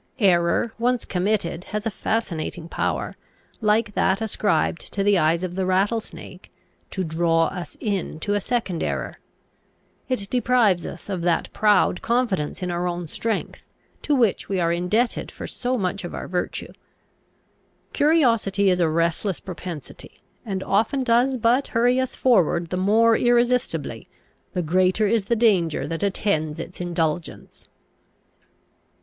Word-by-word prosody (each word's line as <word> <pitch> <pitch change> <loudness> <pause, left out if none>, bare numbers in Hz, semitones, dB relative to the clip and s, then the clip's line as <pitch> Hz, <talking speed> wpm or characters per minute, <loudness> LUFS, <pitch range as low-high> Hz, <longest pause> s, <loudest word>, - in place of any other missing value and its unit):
Error, 180 +1 +2
once 245 0 +1
committed, 180 -2 -1
has 210 +1 -4
a 225 - 0
fascinating 175 -6 -3
power, - - -2 0.5
like 215 0 +2
that 190 0 +2
ascribed 200 -6 -1
to 200 - 0
the 200 -2 +4
eyes 165 +3 +2
of 180 -1 -3
the 190 +1 -1
rattlesnake, 195 +5 -2 0.4
to 190 - -3
draw 165 0 +2
us 180 -5 -8
into 200 -2 -2
a 205 - +1
second 205 -7 -2
error. - - -3 0.9
It 210 -6 -1
deprives 240 -8 +2
us - - -9
of 190 -4 -3
that 170 -1 0
proud 205 -4 +3
confidence 225 -10 -1
in 180 - -2
our 175 +1 -1
own 175 0 -3
strength, 225 +8 -4 0.3
to 295 - +1
which 230 -7 +1
we 195 -2 0
are 170 -1 +2
indebted 210 +8 0
for - - -8
so 255 0 -2
much 195 -1 -2
of 175 - -6
our - - -6
virtue. 180 -1 -3 1.2
Curiosity 230 - +3
is 180 - +1
a 170 -2 +3
restless 170 +4 0
propensity, 175 -4 -9 0.2
and 195 -5 -3
often 225 +7 +1
does 250 +2 +3
but 240 +4 +2
hurry 245 +2 +3
us 260 -1 -2
forward 175 -8 +2
the - - 0
more 220 +5 +4
irresistibly, 245 +1 +1 0.5
the 180 - -1
greater 185 +5 +2
is 215 -1 +1
the 235 - +1
danger 195 -9 +2
that 165 -1 -4
attends 185 -6 0
its 180 - -7
indulgence. 170 -2 -3
195 Hz, 145 wpm, -23 LUFS, 175-230 Hz, 1.2 s, the